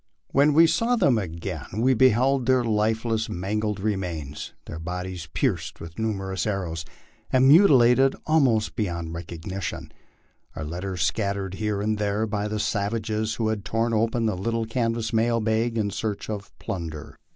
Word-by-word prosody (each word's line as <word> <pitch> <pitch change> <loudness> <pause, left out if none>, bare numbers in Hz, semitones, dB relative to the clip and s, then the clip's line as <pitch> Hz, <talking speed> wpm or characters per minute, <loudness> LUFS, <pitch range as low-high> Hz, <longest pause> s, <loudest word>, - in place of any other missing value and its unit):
When 145 +2 +4
we 165 +2 +8
saw 230 +9 +2
them 130 - +3
again 85 -4 -5
we 130 +4 +3
beheld 130 +1 +3
their 130 -1 +4
lifeless, 110 0 0
mangled 105 +3 -2
remains, 90 -8 -3
their 80 - -7
bodies 90 0 -5
pierced - - -1
with 80 +3 -9
numerous 95 -3 -2
ar 100 -2 -1
rows, 80 -1 -4 0.5
and 130 0 +5
mutilated 135 -5 +6
almost 130 -9 +2
beyond 85 -6 -3
recognition 85 +3 -6 0.6
our 80 - -4
letters 90 +2 -3
scattered 100 +1 -1
here 105 0 -2
and 110 0 0
there 105 +1 0
by 105 -1 -2
the 105 0 -3
savages, 110 +1 -1
who 110 -2 0
had 110 -3 -2
torn 115 +2 0
open 115 +1 +1
the 110 -3 +1
little 115 +4 -1
canvas 115 0 -1
mail 115 +1 +2
bag 115 +1 0
in 105 -2 0
search 110 +1 -3
of 105 -1 -6
plunder. 80 -5 -6
110 Hz, 155 wpm, -25 LUFS, 95-115 Hz, 0.6 s, we